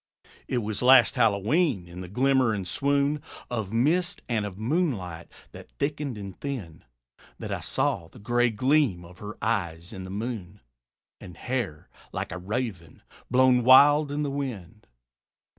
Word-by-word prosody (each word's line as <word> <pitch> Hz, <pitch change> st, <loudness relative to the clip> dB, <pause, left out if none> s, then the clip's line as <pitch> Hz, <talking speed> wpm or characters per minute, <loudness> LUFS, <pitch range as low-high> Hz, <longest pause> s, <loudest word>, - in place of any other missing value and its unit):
It 125 Hz, -3 st, -1 dB
was 105 Hz, -1 st, -3 dB
last 130 Hz, +1 st, +7 dB
Hallowe'en 115 Hz, -, +1 dB
in 90 Hz, +1 st, -9 dB
the 90 Hz, -, -7 dB
glimmer 130 Hz, +3 st, +2 dB
and 95 Hz, -3 st, -4 dB
swoon 140 Hz, +6 st, +1 dB, 0.3 s
Of 110 Hz, -5 st, -3 dB
mist 170 Hz, -, +1 dB
and 110 Hz, -4 st, -1 dB
of 95 Hz, -2 st, -9 dB
moonlight 110 Hz, -, -2 dB, 0.2 s
that -, -, -12 dB
thickened 145 Hz, -4 st, -2 dB
and 100 Hz, -2 st, -7 dB
thinned, 95 Hz, -, -6 dB, 0.5 s
That -, -, -6 dB
I -, -, -2 dB
saw -, -, -1 dB
the -, -, -17 dB
gray 120 Hz, +3 st, +1 dB
gleam 120 Hz, -, +1 dB
of 90 Hz, +1 st, -15 dB
her 105 Hz, +1 st, -8 dB
eyes 85 Hz, -6 st, -2 dB
in 95 Hz, -, -7 dB
the 95 Hz, -, -8 dB
moon, 105 Hz, -2 st, -5 dB, 0.6 s
And 90 Hz, -, -11 dB
hair, 120 Hz, -12 st, -3 dB, 0.2 s
like -, -, -4 dB
a 95 Hz, -, -5 dB
raven, 95 Hz, -, -5 dB, 0.3 s
blown 125 Hz, -1 st, +4 dB
wild 145 Hz, +4 st, +7 dB
in 145 Hz, +1 st, -1 dB
the 145 Hz, -, -2 dB
wind. 110 Hz, -8 st, -6 dB
115 Hz, 155 wpm, -26 LUFS, 95-135 Hz, 0.6 s, last